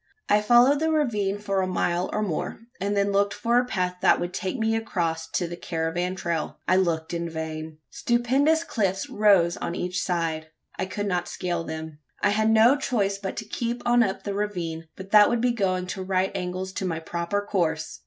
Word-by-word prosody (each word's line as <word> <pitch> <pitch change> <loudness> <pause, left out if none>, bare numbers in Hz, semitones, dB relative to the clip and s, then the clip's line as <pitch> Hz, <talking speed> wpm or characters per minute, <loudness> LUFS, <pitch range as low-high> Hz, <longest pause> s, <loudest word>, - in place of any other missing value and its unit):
I 210 0 +5
followed 245 +6 +5
the 320 +1 +1
ravine 215 -11 +1
for 195 -2 -1
a 185 - 0
mile 175 -1 0
or 215 - -1
more; 185 +2 -3 0.2
and 200 +1 -1
then 200 0 +2
looked 200 +1 +1
for 235 +1 +2
a 250 - 0
path 180 -6 -2
that - - +4
would 175 +1 -3
take 190 +6 -3
me 225 -1 +1
across 165 -7 -2
to 175 - 0
the 175 - -6
caravan 175 +2 -2
trail. 170 -3 -3
I 185 - +4
looked 170 -3 0
in 170 0 -2
vain. 160 -1 -5
Stupendous 270 +7 +2
cliffs 195 - -1
rose 195 -5 +4
on 170 - -4
each 180 0 -2
side. 165 -3 -1 0.3
I - - -3
could 205 +2 -3
not 180 -3 -1
scale 175 -2 -3
them. 160 -1 -7 0.2
I - - +2
had 220 +1 +2
no 225 +4 +6
choice 200 -8 0
but 195 -2 -5
to 220 - -4
keep 235 +3 -3
on 240 0 +4
up 195 -4 0
the 200 - -3
ravine; 175 -6 -3
but 190 +1 -10
that 210 -1 +7
would 240 - +1
be 245 +1 +2
going 190 -5 0
at 180 - -5
right 190 0 0
angles 185 +1 -4
to 190 - -3
my 165 -3 -1
proper 170 +4 -2
course! 160 -6 -1
190 Hz, 205 wpm, -25 LUFS, 170-215 Hz, 0.3 s, that